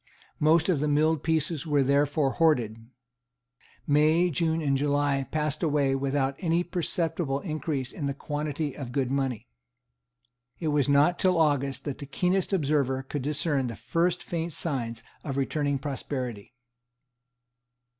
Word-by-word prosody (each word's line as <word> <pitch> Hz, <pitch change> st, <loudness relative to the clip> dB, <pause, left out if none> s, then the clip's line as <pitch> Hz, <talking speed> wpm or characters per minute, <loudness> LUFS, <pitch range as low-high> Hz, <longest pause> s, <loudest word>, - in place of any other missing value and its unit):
Most 160 Hz, +2 st, +4 dB
of 175 Hz, -7 st, +2 dB
the 150 Hz, -, 0 dB
milled 150 Hz, +1 st, +2 dB
pieces 160 Hz, -1 st, 0 dB
were 145 Hz, -2 st, +3 dB
therefore 140 Hz, +1 st, +2 dB
hoarded. 115 Hz, -9 st, +1 dB, 1.0 s
May, 155 Hz, +4 st, +3 dB
June 160 Hz, +1 st, +1 dB
and 140 Hz, -4 st, +1 dB
July 140 Hz, -1 st, +1 dB
passed 150 Hz, -2 st, -1 dB
away 145 Hz, -4 st, +2 dB
without 135 Hz, 0 st, 0 dB
any 170 Hz, -1 st, +1 dB
perceptible 165 Hz, -4 st, -1 dB
increase 155 Hz, -6 st, -3 dB
in 145 Hz, -, -4 dB
the 140 Hz, -, -2 dB
quantity 150 Hz, 0 st, -3 dB
of 125 Hz, -4 st, -7 dB
good 135 Hz, -2 st, 0 dB
money. 130 Hz, -4 st, -1 dB, 1.1 s
It 160 Hz, -, -1 dB
was 145 Hz, -2 st, +2 dB
not 145 Hz, +5 st, +4 dB
till 185 Hz, -2 st, +3 dB
August 140 Hz, -4 st, +1 dB
that 145 Hz, -2 st, -5 dB
the 140 Hz, -, -7 dB
keenest 180 Hz, +6 st, 0 dB
observer 140 Hz, -6 st, +1 dB
could 140 Hz, +1 st, -4 dB
discern 145 Hz, -1 st, 0 dB
the 115 Hz, -, -5 dB
first 165 Hz, -, 0 dB
faint 170 Hz, -1 st, -3 dB
signs 115 Hz, -8 st, -2 dB, 0.2 s
of 135 Hz, -3 st, -4 dB
returning 140 Hz, +1 st, 0 dB
prosperity. 125 Hz, -5 st, -5 dB
145 Hz, 140 wpm, -27 LUFS, 135-160 Hz, 1.1 s, Most